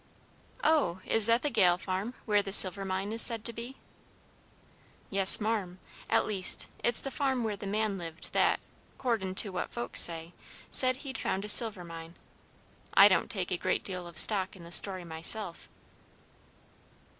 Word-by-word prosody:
"Oh, 295 - -1
is 225 -1 +5
that 230 +1 0
the 295 - -3
Gale 180 -6 +1
farm, 190 +6 -7
where 205 -1 0
the 200 -1 -9
silver 195 0 +5
mine 190 +2 -6
is 230 - +5
said 230 -2 +4
to 235 - -2
be?" 235 +4 -10 1.4
"Yes, 195 -1 +6
marm; 210 -5 -5 0.3
at - - 0
least, 195 -4 +2
it's 240 -1 +3
the 275 - -8
farm 265 -4 -3
where 215 -2 -5
the 200 0 -10
man 210 -1 -4
lived 165 -1 -11
that, - - 0 0.4
'cordin' 220 -7 -4
to 200 +1 0
what 180 -1 -7
folks 240 0 -2
say, 165 0 +3 0.4
said 255 -1 +4
he'd 265 -1 -8
found 195 +2 -5
a - - -3
silver 210 -5 +3
mine. 165 0 -12 0.8
I - - +6
don't - - -2
take - - -6
a - - -3
great - - -4
deal 180 -2 -7
of 170 -2 -14
stock 195 +1 +2
in 180 - -16
the 170 - -14
story 185 0 +2
myself." 170 +3 +1
200 Hz, 170 wpm, -27 LUFS, 180-230 Hz, 1.4 s, Yes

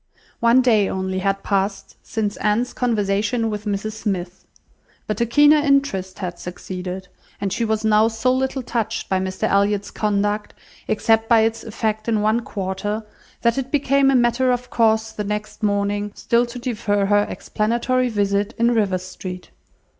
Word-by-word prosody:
One 235 +2 +5
day 220 -5 +3
only 190 0 -2
had 195 +1 -1
passed 195 0 -1
since 210 -2 -2
Anne's 215 +4 0
conversation 220 -1 0
with 210 0 -5
Mrs 205 +1 -2
Smith; 190 -4 -4 0.6
but 215 +2 -3
a 235 - +2
keener 295 +5 +6
interest 275 -11 +1
had 175 -3 -5
succeeded, 180 +1 -6 0.3
and 200 -2 -2
she 235 - -1
was 220 -1 0
now 215 0 +5
so 230 +3 +1
little 265 0 -1
touched 230 -2 -3
by 190 - +2
Mr 190 0 -4
Elliot's 200 0 +1
conduct, 205 0 -1 0.3
except 225 +1 +2
by 230 -2 +6
its 225 0 0
effects 220 0 -2
in 220 -2 +2
one 215 +2 +2
quarter, 205 0 -4 0.4
that 235 +2 +2
it 265 -1 -4
became 275 -1 +3
a 270 - +3
matter 245 +1 +3
of 245 0 -2
course 220 -1 +2
the 210 - -4
next 210 +2 -4
morning, 205 0 0
still 240 +1 +1
to 240 +1 -8
defer 210 -5 -1
her 205 +1 +3
explanatory 240 +4 0
visit 200 -1 0
in 235 +1 +3
Rivers 195 -5 +1
Street. 180 -1 -8
215 Hz, 160 wpm, -21 LUFS, 200-235 Hz, 0.6 s, keener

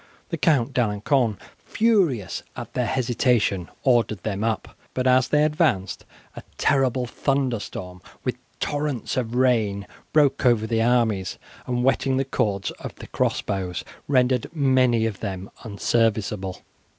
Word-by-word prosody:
The 165 - -2
Count 135 -2 +2
D'Alencon, 115 0 +1 0.3
furious 180 - +1
at - - -8
their 125 -2 0
hesitation, 120 -7 +1
ordered 115 -7 +2
them 105 -1 -2
up, 110 -2 -2 0.2
but 130 - -1
as 130 0 +4
they 150 0 +3
advanced 150 - 0 0.3
a - - -7 0.2
terrible 130 -2 +2
thunderstorm, 115 -9 -2 0.2
with - - -1 0.2
torrents 145 -4 -2
of 120 -2 -2
rain, 110 -6 +2 0.3
broke 145 -3 +3
over 120 -4 +4
the 115 0 0
armies, 115 -6 +1 0.3
and 125 -1 0
wetting 135 0 +2
the 135 - +1
cords 100 -6 -1
of - - -7
the - - -10
crossbows 95 -3 -2 0.2
rendered 125 -3 +2
many 130 -5 +3
of 110 -4 -3
them 95 -2 -5
unserviceable. 105 -3 -1
120 Hz, 130 wpm, -24 LUFS, 105-130 Hz, 0.3 s, as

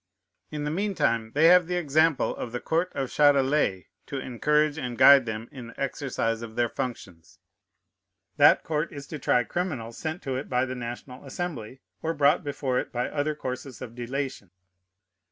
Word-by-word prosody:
In 150 -1 -4
the 150 - -2
mean 200 +4 -1
time 115 -6 0
they 155 +2 +4
have 180 -1 +6
the 180 - -1
example 155 -2 +2
of 120 - -6
the 120 - -3
court 170 +6 -1
of 135 -2 -2
Châtelet 140 -8 +3 0.2
to 140 - -4
encourage 150 +4 +1
and 125 -3 -4
guide 135 -1 +7
them 110 +1 -4
in 125 -3 -9
the 115 - -13
exercise 125 -4 -2
of 115 -1 -8
their 120 -1 +1
functions. 105 -11 -7 1.0
That - - +6
court 155 +1 -2
is 140 -2 -8
to 155 +1 -7
try 125 -2 +2
criminals 120 - -4
sent 160 +2 -4
to 135 -2 -3
it 135 - -6
by 125 0 +1
the 130 - -5
National 125 +1 -7
Assembly, 135 -5 -6 0.2
or 165 +1 -2
brought 145 0 +3
before 140 -3 -1
it - - -5
by 120 0 -2
other 150 +1 -1
courses 130 -3 -6
of 120 -3 -8
delation. 125 -3 -4
135 Hz, 180 wpm, -26 LUFS, 120-150 Hz, 1.0 s, guide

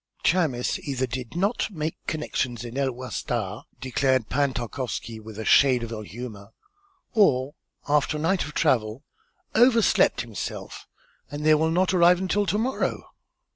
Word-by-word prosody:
"Chamis 155 -9 +1
either 130 -2 -2
did 125 +2 -6
not 200 +7 0
make 160 -5 -3
connections 130 -6 -2
in 120 +1 -8
El 135 -1 0
Wasta," 120 -4 -4 0.2
declared 130 -2 +1
Pan 140 0 +1
Tarkowski, 120 -2 -4
with 110 -1 -11
a 110 - -5
shade 130 -1 +5
of 115 - -6
ill 110 -2 -5
humor, 105 -1 -9 0.6
"or 140 - +3 0.3
after 150 +1 +2
a - - -5
night 180 +4 +1
of 145 - -8
travel 120 -4 +1 0.5
overslept 230 - +4
himself, 115 -4 -7 0.4
and 145 +1 -5
they 155 - +6
will 160 +1 +3
not 180 +3 +2
arrive 175 0 +6
until 195 +2 0
to 195 +4 +1
morrow." 250 +5 -2
135 Hz, 150 wpm, -25 LUFS, 120-165 Hz, 0.6 s, they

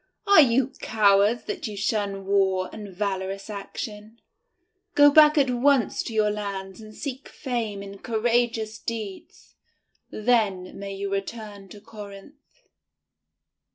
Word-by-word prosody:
Are 400 -5 +8
you 255 -1 +3
cowards 205 +1 +3
that - - -4
you 210 -1 -7
shun 200 -2 -1
war 190 -2 +1
and 210 -1 -8
valorous 195 +1 -3
action? 210 +2 -7 0.8
Go 290 0 +7
back 300 +1 +7
at 270 -3 +3
once 255 0 +2
to 230 - -6
your 210 -1 +3
lands 200 -1 -5
and 215 -1 -12
seek 270 -1 -6
fame 230 -7 -4
in 200 0 -10
courageous 230 -1 0
deeds; 215 -4 -7 0.6
then 210 -6 0
may 200 0 -6
you 200 0 -4
return 200 0 -5
to 205 - -11
Corinth." 215 - -13
215 Hz, 125 wpm, -25 LUFS, 200-240 Hz, 0.8 s, Are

